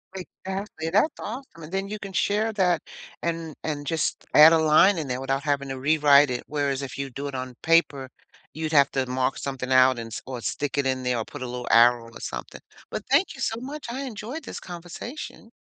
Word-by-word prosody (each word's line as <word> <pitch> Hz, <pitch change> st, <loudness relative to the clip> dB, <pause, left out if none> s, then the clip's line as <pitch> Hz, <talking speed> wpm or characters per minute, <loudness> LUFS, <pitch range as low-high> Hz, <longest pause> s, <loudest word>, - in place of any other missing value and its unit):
Exactly, 190 Hz, -2 st, -6 dB
that's 210 Hz, -, +2 dB
awesome 230 Hz, -, -7 dB
and 155 Hz, -, -10 dB
then 195 Hz, +1 st, -2 dB
you 215 Hz, -, -5 dB
can 200 Hz, -1 st, -7 dB
share 210 Hz, +3 st, +1 dB
that 180 Hz, -5 st, +2 dB, 0.4 s
and 165 Hz, -2 st, -3 dB
and 145 Hz, -2 st, -3 dB
just 160 Hz, -1 st, -1 dB
add 155 Hz, +2 st, +9 dB
a 165 Hz, -, +5 dB
line 160 Hz, +5 st, +5 dB
in 155 Hz, -3 st, -3 dB
there 125 Hz, 0 st, -3 dB
without 135 Hz, +1 st, -1 dB
having 140 Hz, -2 st, -1 dB
to 135 Hz, -1 st, -4 dB
rewrite 145 Hz, 0 st, +5 dB
it 125 Hz, -1 st, -3 dB
whereas 140 Hz, -2 st, -1 dB
if 135 Hz, -, -6 dB
you 140 Hz, 0 st, -3 dB
do 140 Hz, +3 st, -5 dB
it 140 Hz, -, -6 dB
on 130 Hz, -1 st, -5 dB
paper, 150 Hz, -5 st, +2 dB, 0.4 s
you'd 155 Hz, +1 st, -4 dB
have 140 Hz, -2 st, +5 dB
to 135 Hz, -1 st, 0 dB
mark 130 Hz, +1 st, -1 dB
something 130 Hz, -2 st, -4 dB
out 130 Hz, 0 st, +6 dB
and 115 Hz, -, -6 dB
s -, -, -5 dB
or 125 Hz, -2 st, -6 dB
stick 140 Hz, +3 st, -3 dB
it 140 Hz, -, +1 dB
in 130 Hz, -1 st, 0 dB
there 125 Hz, -1 st, 0 dB
or 115 Hz, -, -1 dB
put 145 Hz, -, -10 dB
a -, -, -3 dB
little 125 Hz, 0 st, -6 dB
arrow 120 Hz, 0 st, +5 dB
or -, -, -11 dB
something, -, -, -6 dB, 0.3 s
but -, -, -4 dB
thank 380 Hz, -, +3 dB
you -, -, -13 dB
so 225 Hz, -, -1 dB
much 285 Hz, +4 st, -7 dB
I 255 Hz, +3 st, -4 dB
enjoyed 250 Hz, +5 st, -6 dB
this -, -, -7 dB
conversation. 180 Hz, -, -8 dB
150 Hz, 220 wpm, -25 LUFS, 130-190 Hz, 0.4 s, add